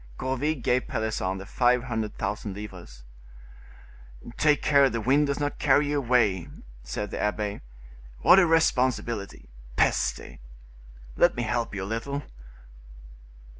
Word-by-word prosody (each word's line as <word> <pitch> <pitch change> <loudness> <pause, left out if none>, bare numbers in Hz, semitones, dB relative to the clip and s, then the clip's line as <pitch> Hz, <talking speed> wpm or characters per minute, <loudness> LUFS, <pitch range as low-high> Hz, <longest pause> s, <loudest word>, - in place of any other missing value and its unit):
Gourville 135 +4 -1
gave 125 -1 0
Pelisson 105 -4 -2
the 95 - -8
five 125 +3 +2
hundred 110 -4 -4
thousand 105 -2 -4
livres. 90 -12 -10 1.3
"Take 150 -1 +2
care 140 -2 +5
the 115 - -3
wind 140 +6 +2
does 140 0 -2
not 145 0 -3
carry 145 +1 +3
you 145 0 +1
away," 115 -9 +1 0.3
said 80 +13 -5
the - - -4
abbe; 105 -1 -2 0.6
"what 190 - +7
a 175 - +4
responsibility. 125 -9 0 0.3
Peste! - - 0 0.8
Let - - +4
me 120 - -2
help 115 0 -2
you 95 - -3
a - - -4
little." 115 +7 -4
120 Hz, 130 wpm, -26 LUFS, 105-140 Hz, 1.3 s, what